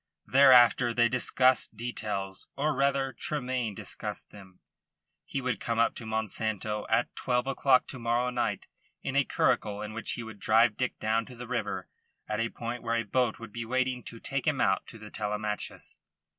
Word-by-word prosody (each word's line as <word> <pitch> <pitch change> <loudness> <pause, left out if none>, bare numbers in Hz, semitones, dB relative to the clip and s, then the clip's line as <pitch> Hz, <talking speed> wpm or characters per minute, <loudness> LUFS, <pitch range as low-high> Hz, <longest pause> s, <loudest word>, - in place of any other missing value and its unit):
Thereafter 125 -3 +6
they 120 0 +5
discussed 125 -1 +2
details; 105 -5 -3
or, 150 +2 +1
rather, 135 -1 +1
Tremayne 125 -7 -2
discussed - - -6
them. 95 -3 -14 0.7
He 135 - -3
would 125 -2 -1
come 115 -1 -2
up 115 - +3
to 115 - -8
Monsanto 110 -1 -2
at 120 - +1
twelve 125 -1 0
o'clock 135 -1 +3
to 130 - -6
morrow 120 +2 +1
night 115 -5 -1 0.4
in 135 - -3
a 140 - +5
curricle 105 -4 0
in 105 0 -6
which 115 0 -3
he 120 - -5
would 110 -2 -10
drive 110 0 +4
Dick 125 -1 -2
down 110 +1 0
to 125 - -11
the 120 0 -8
river 100 -6 -3 0.4
at 105 0 -2
a 115 0 0
point 120 +1 -5
where 115 0 -1
a 115 - +1
boat 120 +2 0
would 115 -2 -10
be 120 - -4
waiting 130 +1 0
to 115 - -7
take 135 +3 -3
him 150 -3 +2
out 95 -5 +2
to - - -10
the 105 -1 -11
Telemachus. 105 0 -4
115 Hz, 185 wpm, -29 LUFS, 110-125 Hz, 0.7 s, Thereafter